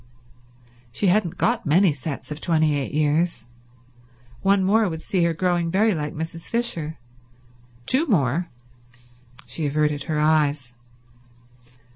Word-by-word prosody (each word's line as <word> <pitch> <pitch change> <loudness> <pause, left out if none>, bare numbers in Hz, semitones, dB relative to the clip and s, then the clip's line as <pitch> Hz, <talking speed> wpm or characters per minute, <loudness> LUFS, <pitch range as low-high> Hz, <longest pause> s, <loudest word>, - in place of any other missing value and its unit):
She 185 - +1
hadn't 190 -5 0
got 240 0 +1
many 170 +2 +4
sets 140 +1 -7
of 150 - -6
twenty 155 -3 +2
eight 140 -2 -3
years. 150 -3 0 1.0
One 195 0 +3
more 210 +2 +3
would 160 -1 -6
see 185 -3 0
her 170 - +1
growing 175 -1 0
very 210 +5 +2
like 150 -3 -4
Mrs. 165 +1 -6
Fisher. 170 -10 -1 0.9
Two 295 +6 +2
more— 165 - +1 1.0
She 155 -3 -3
averted 150 0 0
her 155 -2 -1
eyes. 150 -4 +1
160 Hz, 125 wpm, -23 LUFS, 150-185 Hz, 1.0 s, many